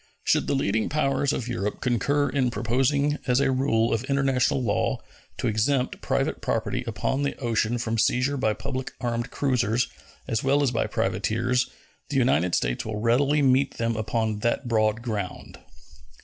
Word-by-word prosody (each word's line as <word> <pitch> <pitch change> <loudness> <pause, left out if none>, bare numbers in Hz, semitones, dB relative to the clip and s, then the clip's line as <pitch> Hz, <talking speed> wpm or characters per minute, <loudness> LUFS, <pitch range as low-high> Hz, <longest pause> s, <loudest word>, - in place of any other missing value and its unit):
Should - - +2
the - - +1
leading 110 -4 0
powers 140 -2 +1
of 120 - -3
Europe 105 -4 -3
concur 140 +4 +1
in 130 -3 +1
proposing 135 +6 +1
as 125 0 +3
a 135 -1 +2
rule 125 -4 +2
of 115 +1 0
international 135 -1 +1
law 105 -3 0 0.4
to - - -3
exempt 125 +5 0
private - - -1
property - - -1
upon 135 - -1
the 140 - -1
ocean 120 -2 0
from 115 -1 -2
seizure 125 +5 +2
by 110 -6 +1
public 130 0 -5
armed 120 -1 -2
cruisers 120 -4 0 0.4
as 110 - -1
well 140 +2 +3
as 135 - +2
by 115 - 0
privateers, 125 +3 0 0.4
the 145 - -1
United 90 - +2
States - - -1
will 110 -1 -4
readily 135 +6 +2
meet 135 +1 +3
them 115 0 0
upon 110 0 -1
that 120 +3 -1
broad 110 -1 +1
ground. 105 -6 -5
120 Hz, 165 wpm, -25 LUFS, 110-135 Hz, 0.4 s, as